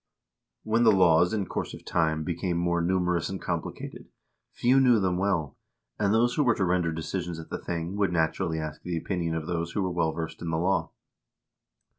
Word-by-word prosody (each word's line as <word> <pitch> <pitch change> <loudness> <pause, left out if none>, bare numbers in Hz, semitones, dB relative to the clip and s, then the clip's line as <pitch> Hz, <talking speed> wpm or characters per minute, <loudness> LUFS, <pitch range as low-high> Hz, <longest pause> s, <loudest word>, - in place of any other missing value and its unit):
When 110 +2 +1
the 110 - +7
laws 90 -3 +5
in 105 -3 -1
course - - -4
of - - -14
time 80 -1 +1
became 85 +1 -2
more 85 0 +1
numerous 90 -1 +1
and 95 0 -4
compli 85 -2 -3
cated, - - -8 0.4
few 130 +3 +3
knew 125 -4 +5
them 95 -2 +1
well, 90 -8 0 0.4
and 100 -1 +2
those 120 +3 +3
who 150 - +2
were 120 -4 +3
to 95 - 0
render 90 -2 +1
decisions 85 +1 -4
at 80 - -10
the - - -3
thing 85 +2 -4
would, 100 -3 +1
naturally, 80 0 0
ask 80 -1 -5
the 90 -1 -3
opinion 85 -1 -2
of 80 -1 -3
those 85 -1 -3
who 100 - 0
were 90 - -1
well 85 -2 +1
versed 80 0 -6
in 85 - -3
the 80 - 0
law. 90 +4 +1
85 Hz, 205 wpm, -27 LUFS, 80-95 Hz, 0.4 s, the